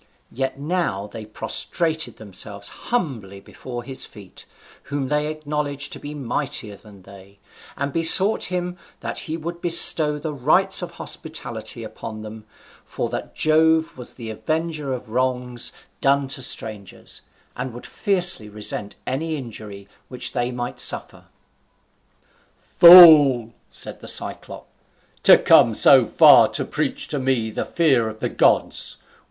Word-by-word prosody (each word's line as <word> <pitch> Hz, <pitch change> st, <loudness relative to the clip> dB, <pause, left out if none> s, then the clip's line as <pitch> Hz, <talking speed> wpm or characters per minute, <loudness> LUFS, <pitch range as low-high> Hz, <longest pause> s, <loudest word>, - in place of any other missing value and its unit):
Yet 135 Hz, +2 st, -4 dB
now 145 Hz, -, -3 dB
they 110 Hz, +1 st, -10 dB
prostrated 160 Hz, +8 st, -3 dB
themselves 100 Hz, -1 st, -6 dB, 0.2 s
humbly 120 Hz, -, -4 dB
before 120 Hz, +4 st, -10 dB
his 135 Hz, +1 st, -5 dB
feet, 100 Hz, -4 st, -13 dB, 0.4 s
whom 140 Hz, -2 st, -4 dB
they 150 Hz, 0 st, -1 dB
acknowledged 150 Hz, -2 st, -4 dB
to -, -, -8 dB
be 145 Hz, +1 st, -9 dB
mightier 125 Hz, -5 st, -4 dB
than 100 Hz, -2 st, -17 dB
they, 100 Hz, +1 st, -16 dB, 0.4 s
and 140 Hz, 0 st, -4 dB
besought 185 Hz, +6 st, +5 dB
him 180 Hz, -1 st, -4 dB, 0.2 s
that -, -, -4 dB
he 160 Hz, -, -3 dB
would 170 Hz, +2 st, -8 dB
bestow 160 Hz, -3 st, +4 dB
the 150 Hz, +1 st, -6 dB
rites 170 Hz, +9 st, +2 dB
of 175 Hz, -, -6 dB
hospitality 170 Hz, -, -7 dB
upon 110 Hz, -1 st, -9 dB
them, 110 Hz, 0 st, -11 dB, 0.4 s
for -, -, -5 dB
that -, -, -7 dB
Jove 160 Hz, +1 st, +2 dB
was 125 Hz, -2 st, -12 dB
the 115 Hz, -3 st, -8 dB
avenger 155 Hz, +3 st, -4 dB
of 125 Hz, -3 st, -7 dB
wrongs 125 Hz, -1 st, -1 dB, 0.3 s
done 140 Hz, 0 st, +1 dB
to 135 Hz, -, -1 dB
strangers, 110 Hz, -5 st, -3 dB, 0.3 s
and 125 Hz, +1 st, -6 dB
would 120 Hz, +1 st, -11 dB
fiercely 180 Hz, -, +2 dB
resent 105 Hz, -1 st, -4 dB
any 155 Hz, +5 st, -3 dB
injury 105 Hz, -7 st, -10 dB, 0.2 s
which 125 Hz, -1 st, -2 dB
they 120 Hz, 0 st, -2 dB
might 120 Hz, 0 st, -6 dB
suffer. -, -, +1 dB, 1.3 s
"Fool!" 150 Hz, -9 st, +7 dB, 0.2 s
said -, -, -7 dB
the -, -, -12 dB
Cyclop, -, -, -5 dB, 0.5 s
"to -, -, +7 dB
come -, -, +4 dB
so -, -, +6 dB
far -, -, +6 dB
to -, -, -3 dB
preach -, -, -3 dB
to 145 Hz, -, -3 dB
me 130 Hz, -4 st, -1 dB
the -, -, -4 dB
fear 135 Hz, -9 st, +1 dB
of 110 Hz, -, -10 dB
the -, -, -3 dB
gods. -, -, +1 dB
135 Hz, 140 wpm, -21 LUFS, 110-155 Hz, 1.3 s, Fool